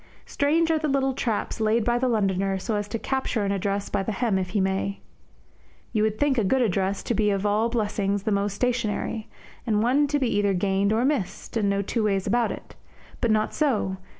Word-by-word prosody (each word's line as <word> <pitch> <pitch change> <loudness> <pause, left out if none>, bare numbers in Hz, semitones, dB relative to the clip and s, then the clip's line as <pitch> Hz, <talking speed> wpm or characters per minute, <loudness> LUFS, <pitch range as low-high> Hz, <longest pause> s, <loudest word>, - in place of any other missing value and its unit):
Strange 320 +3 +1
are 320 - +2
the 305 - -1
little 270 -1 +1
traps 230 -3 -2
laid 220 +1 +2
by 240 0 +2
the 260 - +1
Londoner 195 -4 +1
so 215 +4 -2
as 205 0 -2
to 230 - -3
capture 260 -4 -1
an 200 - 0
address 200 +1 -1
by 200 - -1
the 215 +3 -2
hem 215 -3 +1
if 185 -1 -3
he 200 - 0
may. 190 +1 -1 0.9
You 215 - +2
would 215 0 +1
think 280 -2 +2
a - - +2
good 255 +6 +2
address 195 -2 0
to - - -1
be 215 -1 +2
of 200 0 0
all 210 +3 +2
blessings 205 -3 -1
the 215 - -1
most 200 0 0
stationary, 225 -2 -1 0.4
and 215 -1 +2
one 275 +5 +3
to 290 +1 +1
be 255 -6 0
either 200 -1 +2
gained 195 +2 +1
or 225 +3 +2
missed, 265 -6 -2
and 210 -3 +1
no 200 0 +1
two 230 +4 -1
ways 195 -3 +1
about 235 +2 +1
it. - - -9 0.4
But 235 - +1
not 215 0 +1
so. 225 -10 0
215 Hz, 220 wpm, -25 LUFS, 200-245 Hz, 0.9 s, one